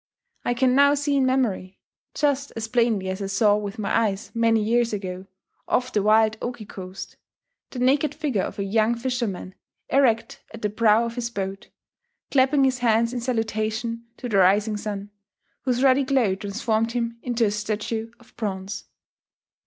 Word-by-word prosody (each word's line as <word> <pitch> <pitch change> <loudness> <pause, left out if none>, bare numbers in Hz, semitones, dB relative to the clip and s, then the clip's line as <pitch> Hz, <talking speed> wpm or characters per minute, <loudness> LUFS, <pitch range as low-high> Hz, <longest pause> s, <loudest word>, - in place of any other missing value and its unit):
I 245 - 0
can 250 +1 +3
now 280 +2 +5
see 290 0 0
in 265 -1 +3
memory, 220 -8 0 0.4
just 280 -1 0
as 225 -1 -3
plainly 230 -5 +1
as 190 +2 -4
I 195 - -2
saw 205 +1 +3
with 205 +1 -4
my 215 - -1
eyes 210 -3 0
many 230 -1 +3
years 230 +2 +1
ago, 190 -2 -5 0.4
off 255 +1 0
the 210 - +2
wild 215 +1 +4
Oki 240 -3 -5
coast, 190 -1 -9 0.5
the - - -9
naked 275 +4 +2
figure 290 -10 -1
of - - -5
a 200 - -1
young 220 +3 +2
fisherman 235 -7 -3 0.4
erect 230 -5 +2
at 225 - -12
the 210 - 0
prow 225 +1 +3
of 230 - -4
his 235 -1 -3
boat, 195 -3 -5 0.6
clapping 270 +1 +4
his 260 -1 +2
hands 230 0 +2
in 245 - -3
salutation 230 -1 -2
to 250 - -5
the 210 -4 +1
rising 200 +3 +4
sun, 205 -1 -5 0.5
whose 250 0 +1
ruddy 270 +1 +5
glow 260 -7 +2
transformed 220 +3 -1
him 235 -1 -2
into 240 -2 0
a 205 - +1
statue 215 +2 -3
of 240 - -22
bronze. 195 -2 -4
225 Hz, 170 wpm, -24 LUFS, 205-250 Hz, 0.6 s, now